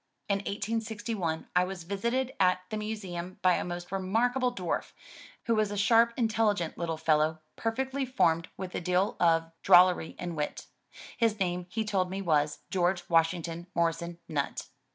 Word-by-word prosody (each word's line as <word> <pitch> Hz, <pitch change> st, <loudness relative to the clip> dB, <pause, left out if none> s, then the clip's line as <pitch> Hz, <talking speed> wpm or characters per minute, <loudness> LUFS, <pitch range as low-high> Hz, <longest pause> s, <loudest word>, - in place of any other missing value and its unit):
In 200 Hz, -1 st, +1 dB
1861 205 Hz, -4 st, -3 dB
I 180 Hz, -, +5 dB
was 180 Hz, -1 st, -5 dB
visited 235 Hz, +8 st, -1 dB
at 185 Hz, -1 st, +3 dB
the 215 Hz, -, -2 dB
Museum 190 Hz, -5 st, -5 dB
by 185 Hz, -1 st, +5 dB
a -, -, 0 dB
most 175 Hz, 0 st, -6 dB
remarkable 240 Hz, +7 st, +1 dB
dwarf, 185 Hz, -8 st, -3 dB, 0.5 s
who 230 Hz, -, +1 dB
was 215 Hz, -2 st, +2 dB
a 205 Hz, -, -4 dB
sharp 230 Hz, +3 st, +5 dB
intelligent 215 Hz, -7 st, +1 dB
little 165 Hz, -2 st, -3 dB
fellow 155 Hz, 0 st, +2 dB, 0.2 s
perfectly 265 Hz, +4 st, -2 dB
formed 170 Hz, -10 st, +1 dB
with 185 Hz, -1 st, -6 dB
a -, -, -2 dB
deal 180 Hz, +3 st, +1 dB
of 165 Hz, -1 st, +3 dB
drollery 180 Hz, -2 st, +5 dB
and 175 Hz, -2 st, -5 dB
wit. 150 Hz, -1 st, -3 dB, 0.5 s
His 225 Hz, -3 st, +1 dB
name 180 Hz, -1 st, -1 dB
he 220 Hz, +3 st, -2 dB
told 190 Hz, -4 st, 0 dB
me 190 Hz, +1 st, -4 dB
was 150 Hz, -5 st, +1 dB
George 175 Hz, -1 st, +1 dB
Washington 165 Hz, +1 st, +1 dB
Morrison 170 Hz, 0 st, 0 dB
Nutt. 145 Hz, -4 st, -3 dB
185 Hz, 155 wpm, -29 LUFS, 170-215 Hz, 0.5 s, I